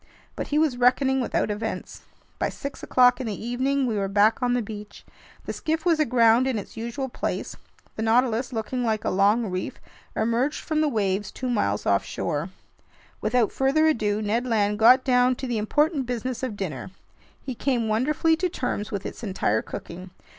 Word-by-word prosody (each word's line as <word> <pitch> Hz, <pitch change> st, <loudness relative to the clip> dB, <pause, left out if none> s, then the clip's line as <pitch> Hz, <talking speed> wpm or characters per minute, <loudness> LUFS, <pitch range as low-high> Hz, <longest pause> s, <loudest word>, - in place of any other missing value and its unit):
But -, -, -4 dB
he 295 Hz, -, 0 dB
was 305 Hz, -5 st, +2 dB
reckoning 265 Hz, +2 st, +3 dB
without 230 Hz, -, 0 dB
events. 220 Hz, +2 st, -5 dB, 0.4 s
By -, -, 0 dB
six 280 Hz, 0 st, -7 dB
o'clock 250 Hz, 0 st, +4 dB
in 250 Hz, -, -4 dB
the 210 Hz, -, -4 dB
evening, 265 Hz, +3 st, 0 dB
we 220 Hz, -4 st, -1 dB
were 195 Hz, -, 0 dB
back 210 Hz, +4 st, +3 dB
on 245 Hz, 0 st, +2 dB
the 245 Hz, -, +1 dB
beach. 210 Hz, 0 st, -9 dB, 0.4 s
The -, -, -4 dB
skiff 320 Hz, +1 st, -2 dB
was 335 Hz, -3 st, +3 dB
aground 240 Hz, -3 st, +4 dB
in 260 Hz, -4 st, 0 dB
its 205 Hz, -, -7 dB
usual 235 Hz, +4 st, -4 dB
place. 245 Hz, -, -4 dB, 0.4 s
The -, -, -2 dB
Nautilus, 235 Hz, +2 st, +2 dB
looking 245 Hz, +2 st, -3 dB
like 220 Hz, -2 st, -1 dB
a -, -, +1 dB
long 205 Hz, +2 st, +2 dB
reef, 185 Hz, 0 st, -4 dB, 0.4 s
emerged 235 Hz, +6 st, 0 dB
from 310 Hz, -1 st, -1 dB
the 310 Hz, -, +3 dB
waves 200 Hz, -4 st, -1 dB
two 255 Hz, -1 st, -4 dB
miles 105 Hz, -, 0 dB
offshore. 145 Hz, -, -1 dB, 0.7 s
Without 225 Hz, 0 st, +2 dB
further 275 Hz, +4 st, +2 dB
ado, 215 Hz, -8 st, +1 dB
Ned 230 Hz, +4 st, 0 dB
Land 210 Hz, -3 st, +1 dB
got 250 Hz, +4 st, +7 dB
down 250 Hz, -1 st, +3 dB
to 265 Hz, -, -6 dB
the 240 Hz, -3 st, -1 dB
important 290 Hz, +5 st, +1 dB
business 250 Hz, 0 st, -3 dB
of 245 Hz, -6 st, -4 dB
dinner. 160 Hz, -8 st, -5 dB, 0.5 s
He 265 Hz, -, -6 dB
came 240 Hz, -2 st, 0 dB
wonderfully 290 Hz, +9 st, +2 dB
to 360 Hz, +2 st, 0 dB
terms 245 Hz, -9 st, -3 dB
with 200 Hz, -2 st, -4 dB
its -, -, -6 dB
entire 185 Hz, -, 0 dB
cooking. 180 Hz, +2 st, -8 dB
235 Hz, 180 wpm, -25 LUFS, 210-260 Hz, 0.7 s, got